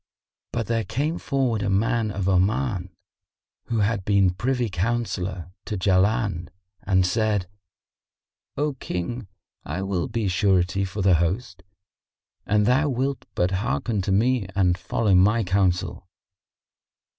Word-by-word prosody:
But 115 -1 -2
there 115 +1 0
came 145 +10 -2
forward 130 -6 0
a 100 - 0
man 110 +3 +1
of 100 -2 -3
Oman, 95 +1 +1 0.8
who 115 -2 0
had 100 -1 0
been 100 -2 +3
privy 125 +5 0
counsellor 95 -3 -2
to 105 - -3
Jaland 95 -1 +1 0.3
and 95 -2 +2
said, 105 -1 0 1.1
"O 145 +1 0
King, 115 -1 -4 0.4
I 85 +6 -4
will 95 -3 -1
be 115 -3 -2
surety 95 0 +2
for 95 +1 -4
the 95 -1 +5
host, 90 +4 -1 0.9
an 105 0 +3
thou 130 +7 +3
wilt 135 +1 -2
but 90 +1 +1
hearken 105 +2 -1
to 95 - -2
me 115 +1 +2
and 90 -3 +3
follow 95 +3 0
my 105 +5 +4
counsel." 95 -1 0
100 Hz, 130 wpm, -24 LUFS, 95-115 Hz, 1.1 s, the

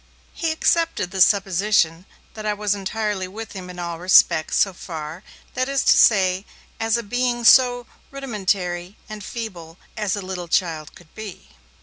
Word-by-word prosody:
He 330 -2 -2
accepted 325 - 0
the 190 - -2
supposition 190 -3 +2 0.3
that 215 - -8
I 210 -1 -1
was 205 0 0
entirely 205 -1 -3
with 220 +4 -8
him 185 -2 -8
in 180 - -10
all 170 -1 -5
respects, 175 -3 +4
so 195 - +2
far, 160 -1 -7 0.3
that 255 +1 -1
is 275 -1 0
to - - +5
say, 190 -3 +4 0.4
as 225 +1 +1
a 235 - -4
being 245 +2 -1
so 245 0 +6 0.2
rudimentary 195 -8 -3
and 215 -1 -8
feeble 185 -8 -7 0.2
as 210 -3 -1
a 205 - -5
little 185 -2 -6
child 165 -3 -1
could 170 -3 -18
be. 215 -4 -10
200 Hz, 160 wpm, -22 LUFS, 180-225 Hz, 0.4 s, so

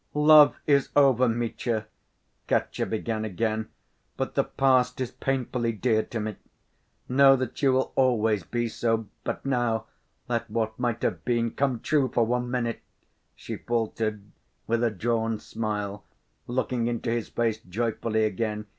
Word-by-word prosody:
"Love 150 -3 +7
is 140 -2 +3
over, 130 -3 +5
Mitya!" 115 -1 -2 0.6
Katya - - 0
began 110 0 -2
again, 110 +1 -2 0.5
"but - - -2
the - - +2
past 130 -2 +2
is 130 -2 -2
painfully 125 -3 -1
dear 110 0 +1
to 115 - -5
me. 110 -1 -4 0.7
Know 135 +1 +6
that 130 +1 -4
you 135 -2 +4
will 130 +1 +1
always 110 -5 +2
be 120 +7 -2
so. 115 -1 -1 0.2
But - - -4
now 120 -5 0 0.4
let 115 -1 -2
what 110 +1 -2
might 120 -2 -1
have - - -1
been 115 -1 0
come 135 -4 -1
true 145 -4 +2
for 120 - +2
one 125 +1 -1
minute," 120 -2 -2 0.5
she - - -6
faltered, 110 -3 -2 0.4
with 115 +1 0
a 120 - +3
drawn 115 +2 -1
smile, 105 -2 -4 0.4
looking 125 -1 -1
into 120 0 -2
his 115 -1 -2
face 115 -2 0
joyfully 110 +2 -1
again. 105 0 -2
115 Hz, 145 wpm, -26 LUFS, 110-125 Hz, 0.7 s, Love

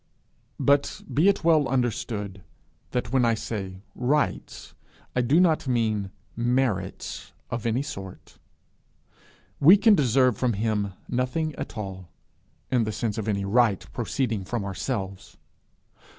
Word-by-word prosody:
But 140 0 +2
be 160 +7 +4
it 200 - 0
well 160 -4 +4
understood 110 -6 -2 0.5
that 125 - -2
when 130 -2 +4
I 115 -1 +3
say 100 -4 -5
rights, 140 +4 -1 0.4
I 125 - +3
do 135 +7 +3
not 165 -6 +3
mean 110 -5 0 0.3
merits 120 -6 -1 0.2
of 115 0 -2
any 120 +4 +1
sort. 95 -10 -9 1.2
We 170 +8 +8
can 215 +2 +6
deserve 130 - +3
from 125 -2 +1
him 105 -1 -1
nothing 130 +6 -1
at - - -7
all, 95 -4 -6 0.6
in 125 -3 +3
the 110 - -2
sense 110 0 -2
of 110 - -4
any 100 -2 0
right 110 -1 +2
proceeding 120 -4 -1
from 100 +2 -3
ourselves. 95 0 -4
115 Hz, 130 wpm, -26 LUFS, 100-135 Hz, 1.2 s, We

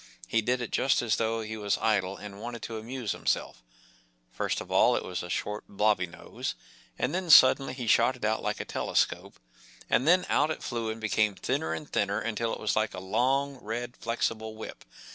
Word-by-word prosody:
He 115 - +2
did 125 +3 0
it 115 - -6
just 130 -2 +2
as 115 - +1
though 115 0 0
he 110 0 -5
was 105 -2 0
idle 100 -3 +1
and 100 -1 -9
wanted 120 -1 -6
to 115 -1 -4
amuse 120 0 -4
himself - - -2 0.7
First - - -1
of - - -8
all - - +5
it - - -2
was 90 - -4
a 90 - -7
short, 105 +4 -3
biobby 100 -2 +2
nose, 85 - -6 0.4
and - - -1
then 180 -1 -2
suddenly 135 -2 +7
he 125 -2 -5
shot 115 +3 +4
it 120 - -5
out 110 +1 +1
like - - -2
a - - -4
telescope, - - -1 0.5
and 130 - +3
then 180 +2 +5
out 150 +2 +2
it 155 - -4
flew 115 -2 -2
and 110 +1 -4
became 105 -2 +1
thinner 80 - -1
and 80 -2 -4
thinner 100 +1 0
until 115 +1 -2
it - - -4
was 110 - 0
like 110 0 0
a - - -5
long, 135 +8 0
red, 120 +3 -4
flexible 110 -1 -2
whip. 110 - -9
110 Hz, 205 wpm, -28 LUFS, 105-120 Hz, 0.7 s, suddenly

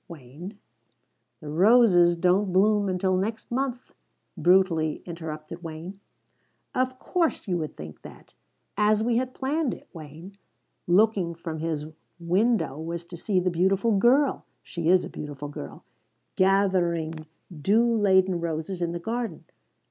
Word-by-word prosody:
Wayne 165 - -10 0.4
" 120 -1 -49
"The 150 - -8
roses 180 0 +5
don't 185 +3 +2
bloom 205 +2 +3
until 185 0 0
next 220 +5 -3
month," 255 0 -3 0.4
brutally 175 -4 +2
interrupted 165 -1 -7
Wayne. 165 +4 -8 0.7
"Of 255 0 -1
course, 330 -2 -1
you 180 -2 0
would 155 -2 -5
think 75 0 -9
of - - -42
that! - - -14 0.4
As 210 +1 +2
we 230 0 +1
had 255 +1 -2
planned 280 0 -1
it, - - -17
Wayne, 165 +5 -11 0.5
looking 185 -2 +2
from 165 -1 -6
his 155 -2 -3 0.3
window 185 - +1
was 170 +1 -5
to 175 - -10
see 185 +2 0
the 180 0 0
beautiful 195 +5 +2
girl 260 +8 +3 0.2
she 170 -1 -3
is 185 0 +4
a - - -6
beautiful 145 -1 -7
girl 105 - -9 0.5
gathering 185 -4 +2 0.4
dew 205 +10 +2
laden 190 -5 +3
roses 170 +2 -4
in 170 0 -1
the 175 - -4
garden. 225 -2 -4
185 Hz, 140 wpm, -26 LUFS, 165-210 Hz, 0.7 s, roses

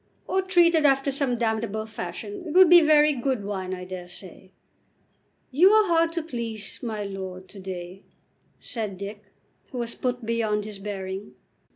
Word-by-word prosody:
"Or 380 - +1
treated 345 -4 +4
after 275 -1 +3
some 275 -1 0
other 240 - -3
damnable 220 -1 -1
fashion, 375 - -7
it 305 - -4
would 370 -2 +8
be 350 -1 +10
very 300 -1 +5
good 255 -4 -1
wine, 190 -2 -4
I 180 -1 -5
dare 180 -1 -7
say." 185 +1 -10 1.0
"You 335 +9 +6
are 430 0 +5
hard 330 0 +3
to 335 -2 -2
please, 230 -8 -5
my 220 -4 -3
lord, 190 -2 -7
to 200 - -11
day," 185 0 -7 0.6
said 215 -6 -4
Dick, 205 +2 -7 0.5
who 255 - -6
was 235 -1 -2
put 250 -2 -3
beyond 220 -2 0
his 210 -2 -7
bearing. 195 -1 -6
225 Hz, 170 wpm, -25 LUFS, 195-295 Hz, 1.0 s, be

